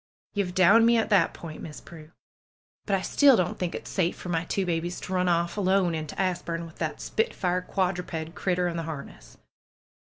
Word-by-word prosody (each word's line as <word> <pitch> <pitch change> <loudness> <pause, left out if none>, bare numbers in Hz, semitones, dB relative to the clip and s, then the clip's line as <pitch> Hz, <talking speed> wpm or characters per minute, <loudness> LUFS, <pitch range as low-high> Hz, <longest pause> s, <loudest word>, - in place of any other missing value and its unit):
^^Ye've 185 -3 -1
downed 210 +5 +6
me 235 0 +5
at 225 0 0
that 190 -5 +4
point. 160 -2 -9
Miss 150 - -8
Prue! 155 -2 -13 0.8
But 200 - +2
I 190 - -1
still 280 -4 +5
don't 180 -2 -1
think 180 -2 -2
it - - -7
safe 180 -3 0
for 180 - -8
my 165 0 0
two 195 +2 -1
babies 175 0 -2
to 190 - -5
run 180 -1 +2
off 170 +2 0
alone 190 -3 +2
into 155 -1 -5
Asburne 170 -3 -1
with 165 - -13
that - - -3
spitfire 185 - -1
quadruped 180 -3 -2
critter 180 -1 0
in 170 -1 -3
the - - -1
harness. 140 - -9
180 Hz, 195 wpm, -27 LUFS, 165-190 Hz, 0.8 s, downed